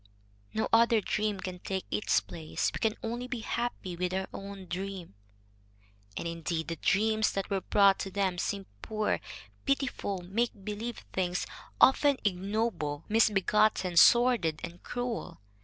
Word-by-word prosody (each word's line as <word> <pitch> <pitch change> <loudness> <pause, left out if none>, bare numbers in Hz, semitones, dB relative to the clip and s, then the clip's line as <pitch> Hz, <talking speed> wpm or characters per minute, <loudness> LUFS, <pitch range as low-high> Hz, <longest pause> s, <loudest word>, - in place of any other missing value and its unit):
No 220 - +1
other 230 0 +6
dream 210 0 -1
can 180 -1 -5
take 190 +1 -3
its 105 -1 +2
place. 80 -5 -3
We - - -4
can 220 -1 +1
only 240 +2 -3
be 245 -2 -4
happy 230 -6 -3
with 180 +1 -1
our 190 0 -1
own 195 -1 -7
dream." 185 - -5 1.0
And, - - -3
indeed, 165 0 -3
the 165 - -3
dreams 215 +1 +2
that 195 +1 -3
were 195 -1 +1
brought 200 +1 +4
to 195 - -3
them 190 -2 -1
seemed 200 0 -2 0.2
poor, 215 -1 -1 0.4
pitiful, 255 -9 -1
make 200 +1 -2
believe 220 +3 -5
things, 180 -1 0 0.3
often 280 +1 +5
ignoble, 195 -6 -1
misbegotten, 210 -3 +3
sordid, 235 -5 +5
and 175 +1 -7
cruel. 245 -1 -4
195 Hz, 140 wpm, -30 LUFS, 180-225 Hz, 1.0 s, other